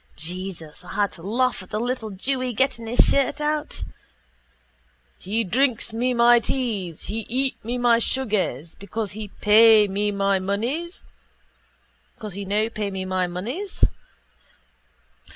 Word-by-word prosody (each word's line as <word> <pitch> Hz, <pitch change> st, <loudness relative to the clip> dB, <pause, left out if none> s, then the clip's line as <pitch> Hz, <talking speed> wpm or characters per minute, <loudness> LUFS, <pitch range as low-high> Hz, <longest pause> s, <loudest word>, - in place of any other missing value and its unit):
Jesus, 170 Hz, -1 st, -5 dB
I -, -, -9 dB
had 205 Hz, 0 st, +1 dB
to 165 Hz, -, -13 dB
laugh 240 Hz, +5 st, 0 dB
at 185 Hz, -, -13 dB
the 215 Hz, -, -2 dB
little 240 Hz, -1 st, -2 dB
jewy 255 Hz, +5 st, -2 dB
getting 235 Hz, -2 st, 0 dB
his 240 Hz, +2 st, +4 dB
shirt 280 Hz, +2 st, +1 dB
out. 300 Hz, 0 st, -2 dB, 1.4 s
_He 215 Hz, +3 st, -1 dB
drink 240 Hz, 0 st, +1 dB
me 245 Hz, +2 st, 0 dB
my 240 Hz, 0 st, +6 dB
teas. 215 Hz, -, -3 dB
He 220 Hz, -, -3 dB
eat 260 Hz, +3 st, -1 dB
me 240 Hz, +3 st, -2 dB
my 240 Hz, -1 st, +4 dB
sugars. 205 Hz, -, -1 dB
Because 205 Hz, +1 st, -5 dB
he 210 Hz, +1 st, -6 dB
no -, -, -23 dB
pay 215 Hz, 0 st, +7 dB
me 205 Hz, +2 st, 0 dB
my 200 Hz, -1 st, +1 dB
moneys? 240 Hz, -, -2 dB
225 Hz, 115 wpm, -23 LUFS, 200-250 Hz, 1.4 s, pay